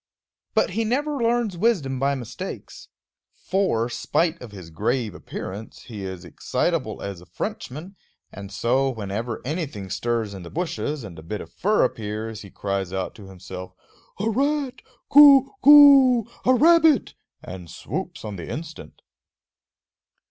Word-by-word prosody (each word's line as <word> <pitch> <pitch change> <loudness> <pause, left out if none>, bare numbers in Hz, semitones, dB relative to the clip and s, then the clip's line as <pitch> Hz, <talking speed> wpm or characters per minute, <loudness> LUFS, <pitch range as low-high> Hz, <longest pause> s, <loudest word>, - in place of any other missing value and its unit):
But - - +2
he 225 +5 -1
never 285 +7 -1
learns 235 -4 0
wisdom 170 - 0
by 140 +1 +1
mistakes; 120 -5 -8 0.5
for, 185 - 0
spite 165 +7 -1
of 120 -4 -9
his 90 -5 -11
grave 110 +5 -1
appearance, 95 +4 -8
he 105 -5 -8
is 95 -2 -7
excitable - - -2
as 100 -3 -6
a 90 - -16
Frenchman; 165 +9 -6 0.4
and 100 -1 -9
so, 125 +8 +1
whenever 110 0 -4
anything 135 - -4
stirs 115 -1 -2
in 95 - -8
the 85 - -9
bushes 150 -4 -3
and 90 -6 -9
a - - -9
bit 95 +6 -5
of 85 - -11
fur 210 +3 +2
appears, 110 -2 -3
he 100 - -11
cries 100 -2 -3
out 95 -1 -3
to 100 -3 -13
himself, 90 0 -9 0.5
A 210 - -1
rat, 275 +3 0 0.3
Kookoo! 280 - +8 0.2
a 255 - +5
rabbit! 320 +1 +4 0.3
and 90 -2 -9
swoops - - -6
on 105 -2 -6
the 85 - -8
instant. 165 +1 -8
125 Hz, 140 wpm, -23 LUFS, -, 0.5 s, Kookoo